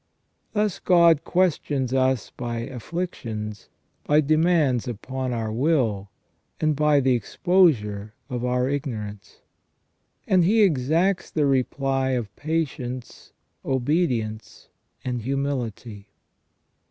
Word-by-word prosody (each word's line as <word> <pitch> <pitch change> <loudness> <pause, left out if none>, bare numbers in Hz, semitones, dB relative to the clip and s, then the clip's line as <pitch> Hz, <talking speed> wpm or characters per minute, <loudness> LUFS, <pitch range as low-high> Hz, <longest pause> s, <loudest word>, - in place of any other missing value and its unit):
Thus 210 -3 0
God 170 -4 +5
questions 145 -7 0
us 130 -3 +1
by 120 -1 -4
afflictions, 115 - -5 0.3
by 150 +1 +3
demands 155 -4 +2
upon 130 +3 -4
our 115 -2 -2
will, 115 -7 +1 0.5
and 155 -1 +1
by 150 0 +3
the 130 -1 +3
exposure 115 - +1
of 125 -3 -4
our 125 0 +1
ignorance 110 -8 -5 0.4
', - - -46
and 185 -2 +4
He 215 +5 +4
exacts 170 +3 +1
the 150 -2 +1
reply 135 0 0
of 110 -4 -5
patience, 135 -6 -4 0.3
obedience, 125 -5 -1 0.4
and 125 -2 -2
humility. 120 -5 -3
130 Hz, 105 wpm, -24 LUFS, 120-155 Hz, 0.5 s, God